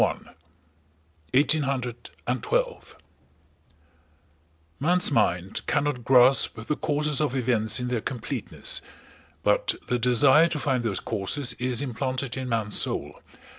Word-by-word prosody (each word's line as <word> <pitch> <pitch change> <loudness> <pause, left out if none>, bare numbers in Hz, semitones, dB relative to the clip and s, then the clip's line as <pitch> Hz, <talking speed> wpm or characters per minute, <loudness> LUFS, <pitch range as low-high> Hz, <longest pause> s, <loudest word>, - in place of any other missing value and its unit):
BOOK - - +2 1.1
THIRTEEN: 150 +4 +3
1812 125 -2 -2
CHAPTER - - -17
I - - -29 1.8
Man's 180 +1 +3
mind 90 -6 0
cannot 145 -5 0
grasp 130 +2 +5
the 150 - -1
causes 150 -1 0
of 145 -3 0
events 115 -4 +1
in 125 0 -3
their 120 -3 -1
completeness, 125 -1 -3 0.6
but - - +2
the 125 - +1
desire 130 +6 +5
to 165 - -3
find 130 -4 0
those 100 -5 -1
causes 110 +8 -3
is 125 +1 0
implanted 130 0 -3
in 130 -1 -4
man's 110 -3 0
soul. - - -3
125 Hz, 125 wpm, -25 LUFS, 120-145 Hz, 1.8 s, grasp